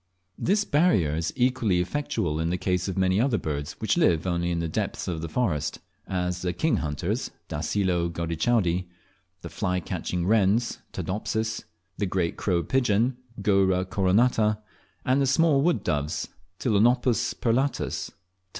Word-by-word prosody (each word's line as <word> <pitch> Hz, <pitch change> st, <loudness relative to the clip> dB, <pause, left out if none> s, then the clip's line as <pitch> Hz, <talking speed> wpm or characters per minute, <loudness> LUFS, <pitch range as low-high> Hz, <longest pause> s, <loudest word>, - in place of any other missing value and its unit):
This 205 Hz, +3 st, +2 dB
barrier 145 Hz, -, +3 dB
is 80 Hz, +1 st, -1 dB
equally 125 Hz, -7 st, +2 dB
effectual 90 Hz, -, -1 dB
in 80 Hz, +1 st, 0 dB
the 90 Hz, -, 0 dB
case 90 Hz, 0 st, -1 dB
of 95 Hz, -, -3 dB
many 95 Hz, +2 st, +3 dB
other 125 Hz, -3 st, +2 dB
birds 75 Hz, -5 st, -3 dB
which -, -, -1 dB
live 85 Hz, -1 st, +3 dB
only 85 Hz, -1 st, 0 dB
in 85 Hz, -, 0 dB
the 85 Hz, 0 st, -1 dB
depths 80 Hz, -, -3 dB
of 85 Hz, -3 st, -3 dB
the 80 Hz, -, -4 dB
forest, 85 Hz, -7 st, -1 dB, 0.3 s
as 90 Hz, -1 st, -2 dB
the 90 Hz, -1 st, -1 dB
kinghunters 80 Hz, -, -1 dB, 0.2 s
(Dacelo 85 Hz, +2 st, 0 dB
gaudichaudi), 85 Hz, +2 st, 0 dB, 0.6 s
the -, -, -6 dB
fly 90 Hz, 0 st, -1 dB
catching 90 Hz, -1 st, -3 dB
wrens 110 Hz, +3 st, +2 dB
(Todopsis), 110 Hz, +2 st, -3 dB, 0.3 s
the 100 Hz, -, +1 dB
great 90 Hz, -2 st, -1 dB
crown 90 Hz, -4 st, 0 dB
pigeon 120 Hz, +1 st, +1 dB, 0.3 s
(Goura 95 Hz, -2 st, +3 dB
coronata), 105 Hz, +3 st, +2 dB, 0.5 s
and 130 Hz, +2 st, +3 dB
the 135 Hz, -, +2 dB
small 150 Hz, 0 st, +4 dB
wood 170 Hz, +3 st, +1 dB
doves 75 Hz, +1 st, -1 dB, 0.3 s
(Ptilonopus 120 Hz, +1 st, +2 dB
perlatus, 130 Hz, +4 st, 0 dB
P. -, -, -27 dB
95 Hz, 145 wpm, -26 LUFS, 85-120 Hz, 0.6 s, small